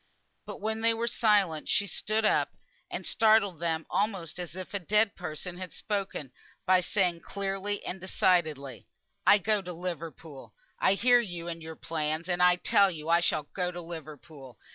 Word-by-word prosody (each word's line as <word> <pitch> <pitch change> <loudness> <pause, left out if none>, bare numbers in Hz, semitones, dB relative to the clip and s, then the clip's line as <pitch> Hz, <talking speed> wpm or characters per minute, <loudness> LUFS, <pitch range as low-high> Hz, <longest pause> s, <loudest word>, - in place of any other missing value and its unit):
But - - -7
when 220 +1 -2
they 230 0 +3
were 230 +1 -1
silent 205 -9 +2
she 200 - +2
stood 215 +4 -1
up, - - +3 0.4
and - - -5
startled 215 -6 +3
them 165 -1 -1
almost 190 -5 -2
as 175 -1 -6
if 185 +1 -7
a 200 - -1
dead 210 +3 +2
person 180 +1 -6
had 185 -1 -7
spoken, 195 - -3 0.3
by 185 -1 +5
saying 180 -3 +1
clearly 200 +2 -3
and 185 - -4
decidedly 155 -8 0 0.4
"I 205 - +8
go 210 +1 +1
to 180 -1 -7
Liverpool. 165 -4 -7 0.2
I 195 - +4
hear 245 +4 +5
you 175 -7 -5
and 165 -1 -5
your 160 0 -8
plans; 155 +1 -3
and 180 -1 0
I 180 0 +6
tell 200 +2 +4
you 160 -3 -6
I 170 +1 +5
shall 155 -3 +1
go 180 -2 -1
to 175 0 -7
Liverpool. 155 -6 -10
180 Hz, 175 wpm, -29 LUFS, 165-200 Hz, 0.4 s, I